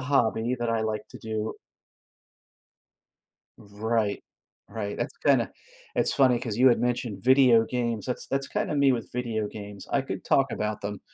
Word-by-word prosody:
hobby 125 -3 +1
that 120 -1 -1
I 115 -1 +1
like 110 -1 -3
to - - -10
do. 110 0 -3 2.0
Right, 105 +1 -2 0.5
right, 105 -2 -4
that's - - -4
kinda - - +4 0.5
it's - - +2
funny 130 -3 +4
'cause 115 -4 -4
you 130 +2 +6
had 120 - +4
mentioned 120 -5 -2
video 130 -4 +6
games, 120 -3 -2
that's 125 - -4
that's 135 0 -1
kinda - - -2
me 140 -2 +5
with 115 -3 -3
video 115 -4 -2
games, 100 -1 -9
I 140 - +2
could - - -6
talk 135 -2 +2
about 105 0 -2
them, 100 -1 -5
115 Hz, 160 wpm, -27 LUFS, 105-125 Hz, 2.0 s, you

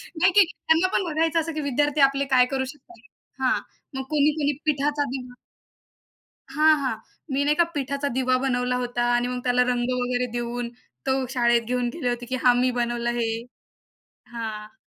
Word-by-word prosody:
नाही, 360 +4 +4
की 410 +2 +7 0.2
त्यांना 325 +3 +4
पण - - +2
बघायचं 325 0 +1
असं, 330 +1 -4
की 310 - -3
विद्यार्थी 290 +1 +1
आपले 275 0 +4
काय 250 0 +6
करू 265 0 -2
शकतात. 255 -4 -13 0.4
हा 255 - +3 0.4
मग 265 - -3
कोणी 300 0 +3
कोणी 290 -1 +1
पिठाचा 290 0 +1
दिवा 250 -1 -6 1.2
हां, 310 +1 +5
हां. 255 -5 -2 0.4
मी 285 - +2
नाही 300 - +4
एका 345 - +6
पिठाचा 280 +1 -2
दिवा 255 0 +2
बनवला 250 -1 0
होता 245 0 -2
आणि 240 0 +1
मग 250 0 -3
त्याला 250 0 +3
रंग 245 +1 -1
वगैरे 245 0 0
देऊन 240 0 -3 0.4
तो 265 0 +2 0.2
शाळेत 235 0 +4
घेऊन 245 +1 -1
गेले 250 -7 -1
होते, 240 0 -3
की 255 +2 -3
हा 245 - +7
मी 255 0 +2
बनवलं 240 0 -1
हे. 225 - 0 1.1
हां. 215 -1 -6
255 Hz, 175 wpm, -24 LUFS, 245-290 Hz, 1.2 s, की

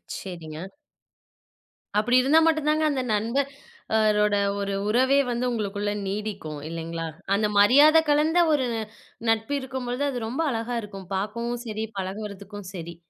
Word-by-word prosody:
சரிங்க. 170 -1 -7 1.3
அப்டி 240 +4 +3
இருந்தா 295 +5 +5
மட்டும் 310 -2 +2
தாங்க 310 +1 +2
அந்த 270 -3 0
நண்பர்ரோட 220 -3 0 0.2
ஒரு 200 0 -2 0.2
உறவே 260 +4 +4
வந்து 240 +1 -1
உங்களுக்குள்ள 205 -2 -2 0.2
நீடிக்கும். 195 -7 -4
இல்லைங்களா? 165 0 -4 0.3
அந்த 210 +1 +2
மரியாத 290 +9 +7
கலந்த 310 +4 +4
ஒரு 265 -4 +1 0.6
நட்பு 225 +5 +1
இருக்கும் 260 -1 -5
பொழுது 260 +4 -1
அது 250 - -3
ரொம்ப 260 +7 -2
அழகா 230 +1 -2
இருக்கும். 195 -3 -9
பார்க்கவும் 235 +4 -3
சரி, 215 0 -3
பழகுறதுக்கும் 200 0 -6
சரி. 170 -1 -7
220 Hz, 130 wpm, -25 LUFS, 200-260 Hz, 1.3 s, மரியாத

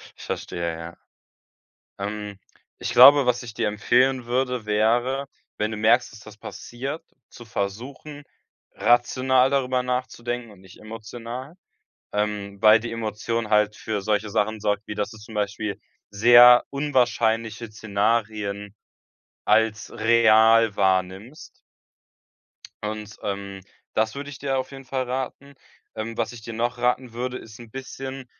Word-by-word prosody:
Ich - - -13
verstehe, 85 -1 -4
ja. 85 +1 -9 1.0
Ähm, 105 0 -5 0.4
ich - - -3
glaube, 140 -1 +8
was 125 0 +1
ich 115 - -9
dir 110 -1 -1
empfehlen 125 +5 +2
würde, 125 -1 -1
wäre, 120 +6 +1 0.3
wenn 105 +1 -1
du 110 - -4
merkst, 115 +3 +3
dass 105 - -13
das 105 0 -14
passiert, 135 +8 -7 0.3
zu 120 - -13
versuchen, 125 +9 -5 0.5
rational 130 +2 +3
darüber 130 -2 0
nachzudenken 125 -2 -3
und 100 - -17
nicht 95 -1 -16
emotional, 115 +5 -8 0.6
ähm, 105 -1 -3
weil 110 +1 +7
die 115 0 -6
Emotion 115 0 -3
halt 105 0 +3
für 105 -2 -4
solche 105 +1 0
Sachen 110 +2 0
sorgt, 105 0 -1
wie 105 - -5
dass 105 +1 -2
du 110 - -11
zum 110 +1 -12
Beispiel 105 0 -2 0.3
sehr 120 +4 +7
unwahrscheinliche 115 -5 0
Szenarien 105 -1 -2 0.7
als 110 +1 +2
real 115 -1 +4
wahrnimmst. 95 - -1 1.2
Und, 105 0 -5
ähm, 100 -1 -5 0.3
das 110 0 +1
würde 145 +1 -6
ich 145 - -10
dir 135 -1 -1
auf 130 +1 -4
jeden 135 0 -10
Fall 130 0 -2
raten. 130 +2 -5 0.4
Ähm, 115 +1 -5
was 115 +1 -2
ich 115 - -10
dir 115 - -8
noch 120 +2 -2
raten 125 0 0
würde, 125 +1 -3
ist 110 -1 -12
'n 115 -2 -13
bisschen 135 0 -7
115 Hz, 140 wpm, -24 LUFS, 105-125 Hz, 1.2 s, glaube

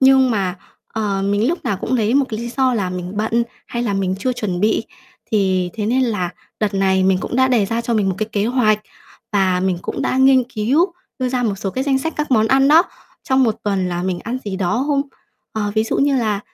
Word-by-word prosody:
Nhưng 265 -1 +5
mà, 190 -4 -1 0.3
ờ, 205 -3 -2
mình 205 +5 +1
lúc 345 - -2
nào 200 - 0
cũng 235 - -4
lấy 225 0 +1
một 280 - +4
cái 215 - -4
lý 235 - -4
do 260 0 +1
là 195 -5 -1
mình 180 0 -5
bận, 225 +3 +1 0.2
hay 235 - -3
là 215 -4 -1
mình 190 -1 0
chưa 255 +5 0
chuẩn 195 -7 -3
bị, 220 +2 +2 0.5
thì 185 -4 +1
thế 210 -2 -2
nên 255 +4 +2
là 205 -8 -1 0.3
đợt 210 -2 0
này 190 -1 +2
mình 190 -1 +3
cũng - - -3
đã 260 0 +4
đề 230 -6 +2
ra 230 +3 -1
cho 235 0 -1
mình 205 -3 +2
một 190 - 0
cái 215 0 -2
kế 205 0 +1
hoạch, 225 -4 +2 0.5
và 190 -3 +2
mình 185 -2 0
cũng - - -4
đã - - 0
nghiên 265 -1 +5
cứu 255 - +1 0.3
đưa 255 -1 0
ra 250 -1 -1
một 215 -4 0
số 195 0 -4
cái 260 +5 -2
danh 270 -2 +2
sách 320 +4 -3
các 300 -1 -2
món 220 -3 +4
ăn 270 +3 +4
đó, 320 +3 +7 0.4
trong 260 0 +2
một 225 -3 +1
tuần 195 -3 0
là 175 0 -2
mình 185 -1 -1
ăn 240 +3 -3
gì 195 -2 -3
đó 205 +8 0
không? 285 -2 +2 0.5
Ờ, 205 -2 -2
ví 220 0 +2
dụ - - -1
như 280 0 +2
là 215 -5 0
220 Hz, 250 wpm, -19 LUFS, 195-255 Hz, 0.5 s, đó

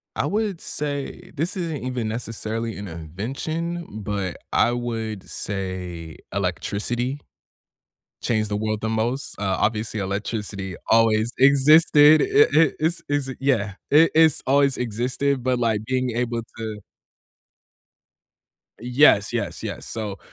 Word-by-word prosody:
I - - 0
would 205 -4 -1
say 150 +5 -4
this 165 +7 -2
isn't 165 -6 -3
even, 125 -3 -2
necessarily, 115 0 -4
an 100 - -6
invention, 135 - -4 0.2
but 100 -3 -3
I 120 - +3
would 115 -4 -4
say, 90 -4 -5 0.2
electricity 120 +6 -2 1.0
changed 110 -2 0
the 105 - -1
world 110 0 -2
the 110 - -1
most. 115 +5 -2
Uh, 95 -2 0
obviously, 110 0 -1
electricity 100 -1 -4
always 115 0 +4
existed. 145 +2 +6
It 420 +2 +4
it 160 -1 +4
it's 160 +3 0
it's 145 -2 -1
yeah. 115 -7 +1 0.2
It 160 +3 +6
It's 160 -2 +5
always 140 0 +3
existed, 125 +3 -1
but, 130 -1 +1
like, 110 -3 +1
being 130 0 0
able 120 -1 -1 0.2
to 110 -2 -5 2.0
Yes, 125 -4 +4
yes, - - -3
yes, - - -5
so, 105 -4 -5
120 Hz, 125 wpm, -23 LUFS, 105-140 Hz, 2.0 s, existed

